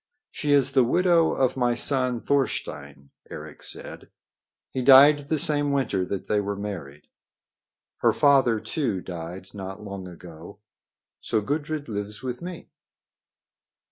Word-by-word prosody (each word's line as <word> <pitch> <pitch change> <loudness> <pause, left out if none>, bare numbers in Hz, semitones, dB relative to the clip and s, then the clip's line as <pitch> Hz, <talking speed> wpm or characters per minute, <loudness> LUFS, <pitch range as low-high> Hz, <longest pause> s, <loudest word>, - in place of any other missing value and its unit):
"She 145 - -2
is 140 -2 +4
the 130 -2 +4
widow 170 +5 +3
of 130 -2 +1
my 120 -2 +1
son 125 -2 +1
Thorstein," 70 - -3 0.2
Eric - - -10
said. - - -6 0.6
"He 130 - -3
died 140 +3 +8
the 155 - 0
same 145 -1 +3
winter 130 -9 0
that 100 +1 -5
they 105 -1 +1
were 100 0 -3
married. 90 -9 -7 0.9
Her - - +3
father, 135 -6 +3
too, 115 -6 -2
died 90 +1 -8
not 95 0 -8
long 100 -2 -7
ago. 85 +1 -12 0.6
So 110 - -1
Gudrid 145 +6 -3
lives 105 0 -6
with 125 -1 -5
me." 175 -1 -8
120 Hz, 135 wpm, -25 LUFS, 95-140 Hz, 0.9 s, died